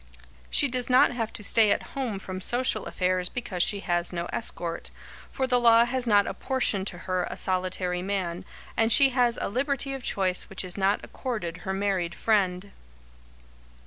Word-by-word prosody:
She 285 - +3
does 250 -1 -1
not 255 0 +5
have 230 -3 -3
to 210 - -3
stay 215 +1 +4
at - - -1
home 250 -7 -2
from 185 -1 -6
social 240 -1 0
affairs 180 -1 0
because 215 -7 -4
she 200 +3 +2
has 175 -2 -1
no 170 -1 -3
escort, 170 -6 -2 0.4
for 265 - -1
the 250 -1 +2
law 235 -1 +6
has 250 0 -2
not 205 -2 +5
apportioned 225 -7 -1
to 175 - -4
her 185 -1 0
a - - -6
solitary 185 -1 -1
man, 185 -2 -3 0.3
and 225 0 +2
she 275 +3 +6
has 245 -2 +2
a - - -2
liberty 275 +4 -1
of 270 - -5
choice 190 -5 0
which 195 - -4
is 180 - -4
not 200 +1 +1
accorded 200 -10 -5
her 190 +2 -4
married 190 -3 -1
friend. 200 -3 0
200 Hz, 175 wpm, -26 LUFS, 185-245 Hz, 0.4 s, law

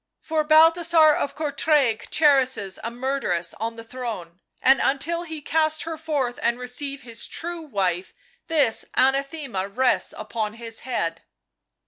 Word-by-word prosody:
" - - -61
For 310 -1 +2
Balthasar 320 0 +6
of 285 - -2
Courtrai 290 -5 +1
cherishes 265 -10 +2
a 230 - -2
murderess 240 -9 -2
on 230 +1 -3
the 230 - -9
throne, 225 -8 -7 0.2
and 270 +1 +4
until 295 +5 0
he 320 -2 -7
cast 310 0 +1
her 330 -1 -4
forth 290 -6 -2
and 235 +1 +1
receive 270 +3 -5
his 230 -2 -5
true 340 0 -5
wife 190 - -2 0.3
this 290 -8 +2
anathema 270 - 0
rests 250 +6 +1
upon 215 0 -4
his 230 -1 -6
head 170 -10 -3
265 Hz, 140 wpm, -24 LUFS, 225-310 Hz, 0.3 s, Balthasar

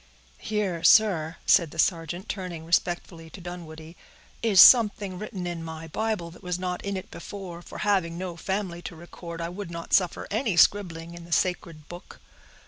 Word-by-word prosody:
"Here, 200 -6 -2
sir," 175 -7 +4
said 170 -3 +4
the 165 - -13
sergeant, 170 +3 0
turning 180 -5 -5
respectfully 170 -1 -1
to 195 - -11
Dunwoodie, 165 -2 -9 0.5
"is 215 -5 +3
something 205 -6 +7
written 205 -4 -6
in 170 -2 -4
my 160 0 -7
Bible 215 -3 -2
that 175 - -15
was 180 -2 -3
not 180 -1 -4
in 200 -1 -3
it 185 - -8
before; 185 -4 -8
for - - -11
having 190 -5 0
no 180 -1 -5
family 190 -1 -3
to 175 - -8
record, 170 0 -9
I 165 - -3
would 185 +1 -7
not 170 0 -7
suffer 180 -3 +2
any 215 -4 0
scribbling 170 -4 +2
in 170 0 -10
the 170 - -15
sacred 165 -3 -1
book." 175 +1 -11
175 Hz, 175 wpm, -26 LUFS, 165-195 Hz, 0.5 s, something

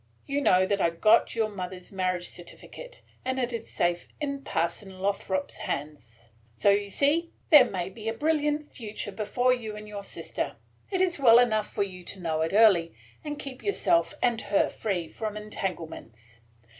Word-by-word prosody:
You 280 +1 -1
know 185 -8 +4
that 200 0 0
I 170 - +4
got 215 +9 +3
your 225 -1 +1
mother's 185 -3 -7
marriage 185 -2 -1
certificate, - - -10 0.2
and 260 +1 -2
it 250 -1 -1
is 230 - -5
safe 175 0 0
in 280 -2 -3
Parson 185 +2 -2
Lothrop's 190 -1 -2
hands. 120 -6 -6 0.2
So 200 - +4
you 200 0 +1
see 300 - +2 0.2
there 300 -4 +10
may 180 -2 -3
be 220 +3 -5
a - - -1
brilliant 300 +1 +1
future 215 -6 -5
before 225 +5 +1
you 220 -4 -5
and 210 0 -9
your 205 -1 -6
sister. 200 - -4 0.3
It 375 -2 0
is 355 -4 +1
well 235 -4 +8
enough 220 -4 +2
for 205 - 0
you 185 -2 -8
to 195 - -6
know 160 -3 -1
it 160 - 0
early, 195 - +5 0.3
and 295 -1 -4
keep 270 -3 -7
yourself 340 -6 +1
and 235 -2 +2
her 200 - +2
free 185 -6 -2
from 215 +2 -5
entanglements. 160 - -6
210 Hz, 175 wpm, -27 LUFS, 180-250 Hz, 0.3 s, there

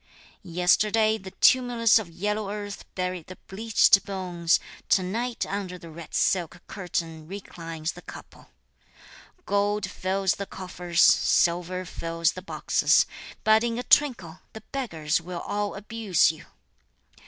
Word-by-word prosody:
Yesterday 210 +5 +2
the 190 - -9
tumulus 235 0 +4
of 205 -6 -7
yellow 210 +4 -2
earth 205 -1 -6
buried 180 -2 -3
the 185 - -9
bleached 205 0 +4
bones, 180 -4 0 0.3
To 190 - +4
night 230 +6 -2
under 190 -2 -4
the 170 -2 -12
red 165 0 -9
silk 175 -2 +1
curtain 165 -5 -5
reclines 165 -4 -6
the 175 - -12
couple! - - -13 1.0
Gold 205 0 0
fills 190 0 0
the 200 - -5
coffers, 180 -2 -1
silver 180 +2 +3
fills 165 0 -1
the 185 - -8
boxes, 185 - +2 0.4
But 220 +1 +5
in 235 -1 -1
a 245 - -3
twinkle, 230 - +2
the 220 - -9
beggars 165 - -1
will 175 0 -6
all 205 0 -3
abuse 205 -4 +1
you! 160 - -14
190 Hz, 130 wpm, -26 LUFS, 170-210 Hz, 1.0 s, But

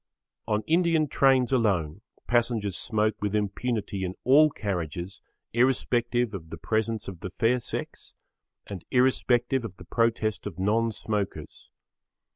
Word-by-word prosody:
On 105 0 0
Indian 165 -2 +2
trains 135 -2 +3
alone 100 - +1 0.2
passengers 115 -5 0
smoke 110 -2 0
with 105 0 -1
impunity 105 -1 -2
in 95 0 -3
all 150 +5 +6
carriages 90 - -4 0.3
irrespective 120 -1 +1
of 80 -5 -7
the - - -7
presence 110 0 -1
of 95 -4 -7
the 95 - -5
fair 115 +6 +1
sex 115 - -5 0.5
and 95 -4 -7
irrespective 125 0 +2
of 100 -5 -7
the - - -12
protest 110 -4 0
of 80 - -8
non 110 +4 +1
smokers. 105 -2 -4
110 Hz, 130 wpm, -27 LUFS, 100-125 Hz, 0.5 s, all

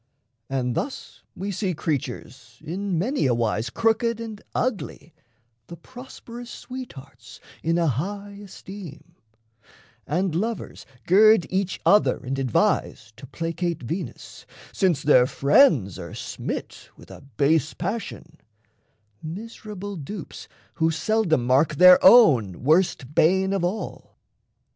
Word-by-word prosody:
And 130 -2 -1
thus 270 - -5
we 195 +2 -4
see 185 -2 -2
Creatures 140 -4 -5
in 185 +3 -3
many 225 - 0
a 120 - +2
wise 115 0 -1
crooked 230 0 0
and 220 -3 -7
ugly 210 - -3 0.5
The 170 - -10
prosperous 245 +2 -11
sweethearts 140 - -10 0.2
in 165 +1 0
a 170 - +1
high 200 - -3
esteem; 175 -5 -11 0.9
And 180 +3 -1
lovers 220 +7 -4 0.2
gird 215 +1 +5
each 190 0 -1
other 205 +1 +4
and 135 +2 -5
advise 125 -3 0
To 135 - -11
placate 165 0 -3
Venus, 165 +1 -7 0.3
since 175 -7 +1
their 130 -4 +5
friends 140 - +3
are 85 -2 -8
smit - - -6
With - - -15
a - - -12 0.2
base 155 +2 +2
passion 180 -4 -6 0.8
miserable 205 +2 -7
dupes 170 +5 -8 0.3
Who 160 - +4
seldom 165 - 0
mark 135 +5 +2
their 180 +4 +7
own 130 - +6
worst 155 -3 +1
bane 190 +5 +3
of 195 -3 -1
all. 190 +5 -5
175 Hz, 120 wpm, -24 LUFS, 140-205 Hz, 0.9 s, their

